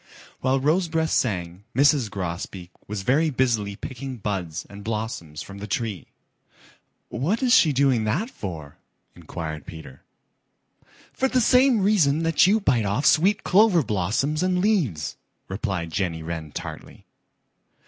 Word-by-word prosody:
While 130 +1 +1
Rosebreast 160 +2 +1
sang, 90 -5 -1
Mrs. 140 -3 +4
Grosbeak 90 -1 -5 0.2
was 100 -1 -4
very 150 +8 +2
busily 115 -7 0
picking 130 +3 -7
buds 95 -6 -4
and 100 0 -11
blossoms 105 -9 -4
from 100 0 -10
the 105 - -6
tree. 105 -3 -3 1.0
"What 170 - -1
is 245 -2 +4
she 155 - +6
doing 135 -4 +2
that 170 - -1
for?" 80 -7 -7 0.4
inquired 80 -3 -7
Peter. 80 -5 -10 1.1
"For 265 - +1
the 255 -1 +1
same 250 -1 +4
reason 165 -7 +3
that 165 +2 +4
you 210 +3 +4
bite 130 - +2
off 110 +9 -1
sweet 195 +7 +4
clover 190 -4 +4
blossoms 110 - -1
and 185 0 +1
leaves," 160 - 0 0.3
replied 95 -4 -3
Jenny 80 -2 -2
Wren 80 -2 -5
tartly. - - -8
120 Hz, 135 wpm, -24 LUFS, -, 1.1 s, she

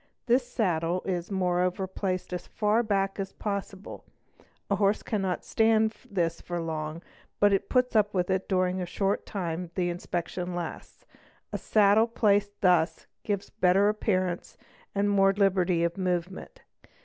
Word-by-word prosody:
This 245 +1 +2
saddle 180 -6 0
is 180 -2 -2
moreover 180 -1 0
placed 185 -1 -3
as 180 - -5
far 215 +2 +1
back 195 -3 -1
as 195 -1 -4
possible; 200 -1 -5 0.6
a 200 - +1
horse 200 +1 +2
cannot 190 -5 -2
stand 220 0 +3 0.2
this 170 -4 -1
for 175 -1 -4
long, 160 0 -4 0.4
but 205 0 +5
it 195 - 0
puts 250 -2 +2
up 210 -1 +4
with 180 -1 0
it 190 0 -1
during 185 -1 +1
the 180 -1 -3
short 195 +2 -1
time 175 -3 -3
the 175 -2 0
inspection 175 +1 -4
lasts. 175 -2 -7 0.5
A - - -2
saddle 215 +1 +4
placed 205 -3 +1
thus 165 -3 +2 0.2
gives 200 -2 -3
a - - -36
better 190 +3 +5
appearance, 185 -4 -1 0.4
and 200 +1 +2
more 195 -1 +4
liberty 185 -3 +2
of 170 +3 -1
movement. 180 0 -3
190 Hz, 150 wpm, -28 LUFS, 175-205 Hz, 0.6 s, but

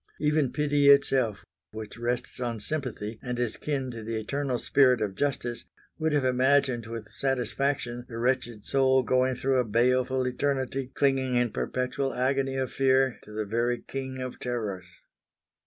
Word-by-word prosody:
Even 150 -3 +2
pity 145 -1 +3
itself 130 -6 +4 0.3
which 110 -1 -7
rests 120 +1 -2
on 120 -3 -2
sympathy 115 -5 -4
and 125 -2 -4
is 120 -3 0
kin 135 -4 -3
to 115 -1 -7
the 110 0 -3
eternal 135 +3 -2
spirit 125 0 +4
of 105 -2 -1
justice, 120 -1 -2 0.3
would 160 0 +1
have 145 -3 +2
imagined 130 -2 +2
with 115 -2 -7
satisfaction 130 -1 -1
the 115 - -6
wretched 120 -3 -1
soul 130 -1 +3
going 130 +1 +2
through 130 +1 +1
a - - +3
baleful 125 +3 +2
eternity 130 0 -1
clinging 135 -2 +2
in 120 -2 +2
perpetual 130 +1 -2
agony 135 +1 0
of 130 -1 -2
fear 130 -1 +2
to 105 - -14
the 105 0 -3
very 120 +3 0
King 130 -1 -5
of 130 -1 -5
Terrors. 105 -7 -3
130 Hz, 155 wpm, -27 LUFS, 120-135 Hz, 0.3 s, itself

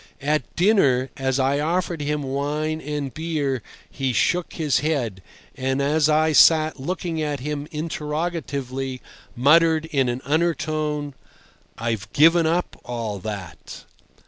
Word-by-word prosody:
At 150 +2 -1
dinner, 145 - +3
as 130 -1 -1
I 135 +2 +2
offered 170 +1 -1
him 150 0 -1
wine 150 +3 -2
and 145 -3 -4
beer 150 -6 -2 0.3
he 135 -2 -2
shook 175 +9 +1
his 150 -5 +1
head, 125 -11 -1 0.3
and 130 +1 -1
as 150 +2 +2
I 155 +1 +3
sat 155 0 +5
looking 165 +2 -3
at 145 -3 -2
him 145 +1 -4
interrogatively, 150 -4 -3 0.4
muttered 160 +4 +4
in 135 -6 0
an 120 +1 -3
undertone: 155 -2 -1 0.6
"I've 110 -2 -3
given 165 +2 +5
up 170 +2 -1
all 115 -4 -4
that." 100 -3 -8
150 Hz, 125 wpm, -23 LUFS, 135-160 Hz, 0.6 s, sat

